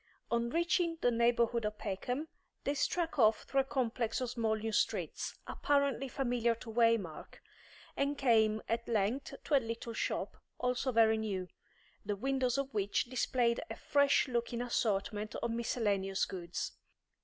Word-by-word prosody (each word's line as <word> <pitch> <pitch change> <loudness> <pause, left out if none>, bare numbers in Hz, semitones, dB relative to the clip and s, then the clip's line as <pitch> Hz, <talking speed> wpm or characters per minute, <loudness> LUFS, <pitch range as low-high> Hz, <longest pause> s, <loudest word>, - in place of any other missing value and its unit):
On 235 0 +1
reaching 335 +2 +1
the 245 - +3
neighbourhood 235 0 +2
of 210 0 -2
Peckham, 245 +10 -3 0.4
they 280 - 0
struck 325 +2 -1
off 220 -2 +5
through 275 - 0
a - - +4
complex 250 -4 -1
of 250 -2 -2
small 225 -3 0
new 220 +1 -3
streets, 210 - -1
apparently 280 -2 +1
familiar 240 -3 0
to 225 0 -9
Waymark, 225 -8 +1 0.6
and 280 +1 0
came 220 -5 +3
at 230 +1 -1
length 225 +4 0
to 295 - +2
a - - +7
little 230 0 -5
shop, - - -2 0.2
also 250 +1 0
very 220 -1 +4
new, 190 -4 -3 0.5
the 205 0 -2
windows 260 +3 0
of 275 -2 -2
which 205 +4 0
displayed 245 -2 +1
a - - -4
fresh 285 0 +3
looking 235 -1 -1
assortment 215 -2 -1
of 235 - -2
miscellaneous 205 -5 0
goods. 175 -2 -4
235 Hz, 150 wpm, -33 LUFS, 220-260 Hz, 0.6 s, a